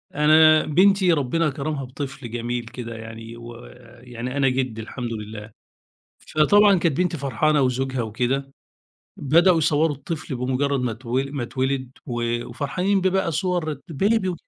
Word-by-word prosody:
أنا 155 Hz, +1 st, +6 dB
بنتي 185 Hz, +3 st, +4 dB
ربنا 155 Hz, +2 st, +1 dB
كرمها 145 Hz, 0 st, -4 dB
بطفل 135 Hz, -2 st, -7 dB
جميل 120 Hz, 0 st, -3 dB
كده 115 Hz, 0 st, -7 dB
يعني، 115 Hz, +1 st, -9 dB
ويعني 120 Hz, +1 st, -9 dB
أنا 135 Hz, -1 st, +3 dB
جِد 125 Hz, -3 st, -2 dB
الحمد 115 Hz, +1 st, -5 dB
لله، 105 Hz, 0 st, -8 dB, 0.7 s
فطبعًا 200 Hz, +5 st, +4 dB
كانت 165 Hz, -5 st, 0 dB
بنتي 180 Hz, -2 st, 0 dB
فرحانة 140 Hz, +2 st, +1 dB
وزوجها 130 Hz, 0 st, 0 dB
وكده، 125 Hz, +5 st, -2 dB, 0.7 s
بدؤوا 170 Hz, +5 st, +4 dB
يصوّروا 155 Hz, 0 st, +2 dB
الطفل 150 Hz, 0 st, -5 dB
بمجرد 130 Hz, +2 st, 0 dB
ما 125 Hz, -2 st, -1 dB
اتو 115 Hz, +2 st, -9 dB
ما 135 Hz, -2 st, -4 dB
اتولد 130 Hz, +1 st, -2 dB, 0.2 s
و 120 Hz, -1 st, -2 dB
وفرحانين 180 Hz, +10 st, -1 dB
بيه 190 Hz, 0 st, +2 dB
بقى 190 Hz, -2 st, 0 dB
صور 165 Hz, -4 st, -1 dB
بيبي 190 Hz, +3 st, +1 dB
135 Hz, 135 wpm, -23 LUFS, 120-160 Hz, 0.7 s, أنا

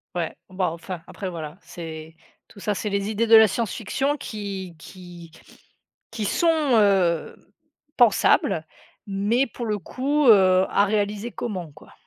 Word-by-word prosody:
Ouais. 170 Hz, -2 st, -3 dB
Bon, 185 Hz, 0 st, -2 dB
enfin, 170 Hz, +1 st, -5 dB
après, 190 Hz, -3 st, -6 dB
voilà, 160 Hz, -1 st, -7 dB
c'est 160 Hz, -1 st, -9 dB, 0.3 s
tout 200 Hz, -, -16 dB
ça, 210 Hz, +1 st, -1 dB
c'est 210 Hz, +1 st, -3 dB
les 200 Hz, +1 st, -2 dB
idées 220 Hz, +2 st, 0 dB
de 225 Hz, -, +7 dB
la 220 Hz, -1 st, +8 dB
science 210 Hz, +2 st, -2 dB
fiction 270 Hz, +6 st, -1 dB
qui 195 Hz, -7 st, -6 dB
qui 175 Hz, -2 st, -12 dB, 0.8 s
qui 220 Hz, -2 st, -4 dB
sont 335 Hz, -, +1 dB, 0.3 s
heu, 185 Hz, -5 st, +2 dB, 0.6 s
pensables 200 Hz, -8 st, +3 dB, 0.4 s
mais 215 Hz, +7 st, +1 dB
pour 240 Hz, 0 st, -7 dB
le 210 Hz, -2 st, -2 dB
coup, 280 Hz, -, -1 dB
heu, 190 Hz, -3 st, +6 dB
à 200 Hz, -, +3 dB
réaliser 210 Hz, +2 st, -2 dB
comment, 185 Hz, -9 st, -5 dB
quoi? -, -, -17 dB
200 Hz, 150 wpm, -23 LUFS, 175-220 Hz, 0.8 s, la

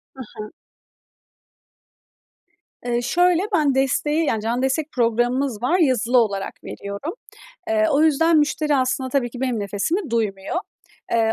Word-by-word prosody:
Hı 265 Hz, -, -8 dB, 0.2 s
hı. 215 Hz, 0 st, -6 dB, 2.3 s
Eee, 240 Hz, 0 st, 0 dB
şöyle, 355 Hz, +7 st, +2 dB
ben 290 Hz, -4 st, +2 dB
desteği 295 Hz, +4 st, +1 dB
-yani 220 Hz, -2 st, 0 dB
canlı 235 Hz, +3 st, -1 dB
destek 285 Hz, +3 st, -1 dB
programımız 240 Hz, 0 st, 0 dB
var 330 Hz, +9 st, +2 dB
yazılı 255 Hz, -5 st, +2 dB
olarak 200 Hz, -4 st, 0 dB
veriyorum. 200 Hz, -, -6 dB, 0.6 s
Eee, 325 Hz, -1 st, +2 dB
o 295 Hz, +1 st, +3 dB
yüzden 320 Hz, +2 st, +4 dB
müşteri 300 Hz, 0 st, +1 dB
aslında 260 Hz, 0 st, 0 dB
tabii 250 Hz, -3 st, 0 dB
ki 245 Hz, -, -9 dB
benim 250 Hz, -5 st, -1 dB
nefesimi 240 Hz, -, -2 dB
duymuyor. 205 Hz, -, -2 dB, 0.6 s
Eee, 225 Hz, -1 st, +2 dB
255 Hz, 135 wpm, -22 LUFS, 230-300 Hz, 2.3 s, yüzden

